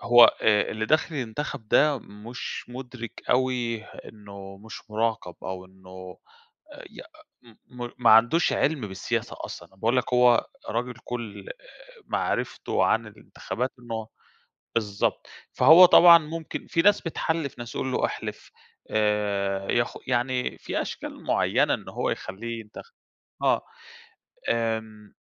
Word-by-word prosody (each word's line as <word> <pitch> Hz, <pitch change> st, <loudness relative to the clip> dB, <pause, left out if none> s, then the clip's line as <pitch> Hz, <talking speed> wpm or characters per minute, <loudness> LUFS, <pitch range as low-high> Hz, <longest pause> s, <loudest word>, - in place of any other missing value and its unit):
هو 120 Hz, 0 st, +8 dB
آآ، 105 Hz, -1 st, +3 dB
اللي 110 Hz, 0 st, -3 dB
داخل 155 Hz, +4 st, +1 dB
ينتخب 130 Hz, -2 st, -5 dB
ده 150 Hz, +3 st, +4 dB
مش 110 Hz, +3 st, -8 dB
مدرك 125 Hz, -2 st, -8 dB
أوي 125 Hz, -3 st, 0 dB
إنه 100 Hz, -3 st, -12 dB
مش 110 Hz, +2 st, -11 dB
مراقب 110 Hz, -5 st, -1 dB
أو 95 Hz, 0 st, -5 dB
إنه 95 Hz, 0 st, -12 dB, 0.7 s
ي -, -, -10 dB, 0.7 s
م 125 Hz, -1 st, -8 dB
م -, -, -6 dB
ما 120 Hz, -, +4 dB
عندوش 120 Hz, +11 st, +5 dB
علم 145 Hz, -2 st, +1 dB
بالسياسة 95 Hz, -, -3 dB
أصلًا، -, -, -9 dB
انا 95 Hz, -, -25 dB
بأقول 115 Hz, +6 st, +1 dB
لك 125 Hz, -, -1 dB
هو 125 Hz, -1 st, +5 dB, 0.2 s
راجل 125 Hz, +2 st, -2 dB
كل 110 Hz, -5 st, -6 dB
آآ، -, -, -7 dB, 0.5 s
معرفته -, -, -1 dB
عن -, -, +1 dB
الانتخابات 125 Hz, +1 st, -5 dB
إنه 115 Hz, -3 st, -6 dB, 0.7 s
بالضبط، 105 Hz, -3 st, -1 dB, 0.3 s
فهو 160 Hz, +8 st, +8 dB
طبعًا 170 Hz, -1 st, +9 dB
ممكن 160 Hz, 0 st, -6 dB
في 165 Hz, -, +1 dB
ناس 205 Hz, +2 st, +5 dB
بتحلف 160 Hz, -4 st, -3 dB
ناس، 120 Hz, 0 st, -7 dB
يقول 130 Hz, 0 st, -2 dB
له: -, -, 0 dB
"أحلف." -, -, -7 dB, 0.4 s
آآ، 100 Hz, -2 st, 0 dB
ياخ 120 Hz, 0 st, 0 dB
يعني 125 Hz, 0 st, -1 dB
في -, -, -3 dB
أشكال -, -, -7 dB
معينة -, -, +2 dB
إن -, -, -8 dB
هو -, -, -2 dB
يخليه 115 Hz, +4 st, -5 dB
ينتخب. 105 Hz, -1 st, -12 dB, 0.5 s
آه، -, -, +2 dB, 0.9 s
آمم 110 Hz, -2 st, -2 dB
115 Hz, 135 wpm, -26 LUFS, 105-130 Hz, 0.9 s, طبعًا